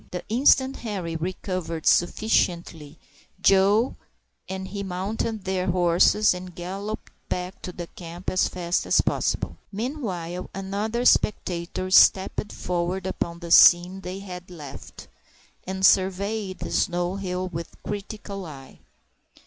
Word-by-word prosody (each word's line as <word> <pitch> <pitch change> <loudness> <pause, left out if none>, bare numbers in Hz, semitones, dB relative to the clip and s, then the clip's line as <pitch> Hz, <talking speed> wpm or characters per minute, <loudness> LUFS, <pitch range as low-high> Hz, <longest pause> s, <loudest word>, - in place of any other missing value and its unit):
The 180 - -5
instant 265 +3 +4
Henri 190 -7 -4
recovered 175 -1 -4
sufficiently, 175 -5 +1 0.4
Joe 195 +5 +4 0.5
and 190 0 -4
he 200 +1 -5
mounted 200 +3 -3
their 190 -1 -1
horses 180 +4 +4
and 180 -1 -8
galloped 195 +5 -6 0.2
back 180 +1 -4
to 180 - -6
the 175 -1 -6
camp 170 +1 -11
as 185 - +2
fast 175 -1 -2
as - - +4
possible. - - -1
Meanwhile, 195 - -4
another 205 +5 -2
spectator 185 -3 +1
stepped 190 +2 +5
forward 180 +1 -2
upon 170 -2 -3
the 170 -1 -7
scene 180 +3 +7
they 185 0 -6
had 185 -2 -9
left, 150 -6 -10 0.6
and 190 0 0
surveyed 195 +1 +2
the - - -6
snow 175 +1 0
hill 185 -1 -3
with 170 -1 -6
a - - -16
critical 200 -2 -6
eye. 135 -3 -12
185 Hz, 125 wpm, -25 LUFS, 175-200 Hz, 0.6 s, scene